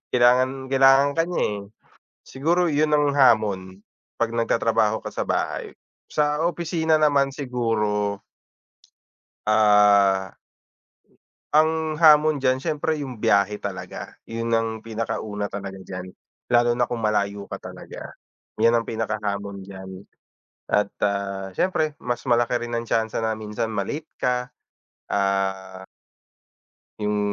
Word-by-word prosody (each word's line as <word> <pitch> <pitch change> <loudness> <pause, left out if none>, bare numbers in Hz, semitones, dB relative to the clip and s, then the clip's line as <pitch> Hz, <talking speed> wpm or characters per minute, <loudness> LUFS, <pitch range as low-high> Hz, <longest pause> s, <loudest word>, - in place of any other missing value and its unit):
kailangan 130 +2 +3
kailangan 135 +1 +5
ka - - +5
niya, 180 - -1 0.2
eh. - - -7 0.7
Siguro 170 +6 +1
yun 150 +1 +1
ang 145 -1 +2
hamon, 100 -7 +2 0.4
'pag 115 - +2
nagtatrabaho 115 -2 +1
ka - - -3
sa - - -2
bahay. - - -2 0.4
Sa 150 0 +1
opisina 165 -2 0
naman 140 -2 +3
siguro 105 -6 -1 1.3
Ah. 105 -3 +4 1.2
Ang 155 0 +2
hamon 155 -1 +6
diyan, 130 -1 +2
siyempre 155 0 -1
yung 130 -5 -7
biyahe 100 +1 +2
talaga. - - -7
Yun 115 0 -4
ang 115 0 +1
pinakauna 110 -2 -4
talaga 100 -1 -6
diyan, 90 -1 -7 0.4
lalo 120 0 +4
na 125 - +2
kung 120 -2 -4
malayo 100 -1 0
ka - - -5
talaga. - - -10 0.5
'Yan 115 - +6
ang 115 - -4
pinakahamon 100 -3 -3
diyan. 95 -1 -9 0.8
At, 105 -1 +2 0.2
ah, 100 -1 -2
siyempre 155 - 0
mas 120 -1 -3
malaki 120 0 +2
rin 120 - -8
ang 115 0 -2
tsansa 110 0 0
na 110 -1 -1
minsan 110 +1 -3
ma-late 115 +10 -4
ka. 125 0 0 0.6
Ah 100 -1 +1 1.5
Yung, 105 0 0
115 Hz, 120 wpm, -23 LUFS, 105-140 Hz, 1.5 s, hamon